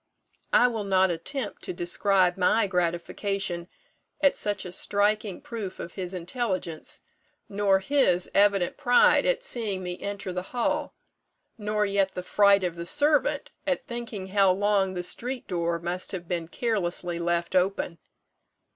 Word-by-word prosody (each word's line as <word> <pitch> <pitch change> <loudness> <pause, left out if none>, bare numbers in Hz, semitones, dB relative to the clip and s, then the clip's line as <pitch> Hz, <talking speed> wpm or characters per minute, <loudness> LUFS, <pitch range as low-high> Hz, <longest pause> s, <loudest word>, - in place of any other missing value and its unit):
I - - +6
will 225 -3 -2
not 190 -2 +3
attempt 210 - -4
to - - -4
describe 180 +1 +2
my 205 +4 +3
gratification 180 0 -2 0.5
at 285 -1 +4
such 205 -2 -1
a 180 - -6
striking 205 +1 0
proof 215 -5 -6
of 170 - -7
his 185 -1 -5
intelligence, 185 -3 -3 0.5
nor 200 -1 +2
his 190 -4 +2
evident 200 -3 +3
pride 245 -4 +4
at - - +1
seeing 215 - -2
me 180 0 -5
enter 200 -2 -4
the 180 - -2 0.2
hall, 235 - 0 0.6
nor 210 -1 -1
yet 200 -1 0
the 180 - -4
fright 200 +1 +4
of 180 -2 -1
the 170 - -5
servant 295 - +2 0.2
at 275 - 0
thinking 230 -5 -6
how 195 -1 +4
long 195 0 +1
the 180 - -3
street 245 +7 -4
door 170 -1 -1
must 175 +3 -4
have 175 -2 -5
been 170 -2 -2
carelessly 175 -5 -2
left 170 +1 -1
open. 180 -2 0
195 Hz, 145 wpm, -26 LUFS, 180-210 Hz, 0.6 s, I